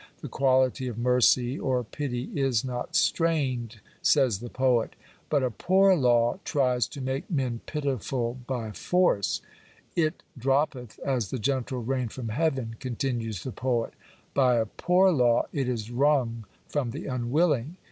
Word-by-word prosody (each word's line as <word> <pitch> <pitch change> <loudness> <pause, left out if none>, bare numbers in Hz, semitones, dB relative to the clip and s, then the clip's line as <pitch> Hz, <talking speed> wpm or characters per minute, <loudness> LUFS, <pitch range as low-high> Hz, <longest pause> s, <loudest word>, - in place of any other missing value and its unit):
The - - -6
quality 130 -1 +2
of 120 -3 -5
mercy 125 +1 +3
(or 130 -2 0
pity) 125 0 -4
is 135 -5 +1
not 125 +7 -4
strained," 140 - +1 0.2
says 130 -9 +3
the 120 +1 -7
poet. 125 -3 +1 0.3
But 145 -3 +2
a 125 - 0
poor 190 - +4
law 120 -5 +3
tries 125 -4 +1
to 140 - -8
make 130 +1 -3
men 130 -7 -1
pitiful 130 -4 -2
by 120 -5 -3
force. 180 - +1 0.3
" - - -31
It 155 +3 -4 0.2
droppeth 135 -2 0
as 125 -7 0
the 130 - -3
gentle 130 0 -1
rain 130 +1 -1
from 115 0 -6
heaven/' 130 -4 -1
continues 120 -5 -3
the 130 - -4
poet 120 -1 -1 0.4
By 130 -3 +4
a 115 -1 +2
poor 180 - +3
law 120 -6 +3
it 135 -3 -1
is 115 -2 -3
wrung 125 -4 +1 0.2
from 145 -5 -1
the 145 +9 -6
unwilling. 135 +3 0
130 Hz, 150 wpm, -27 LUFS, 120-140 Hz, 0.4 s, poor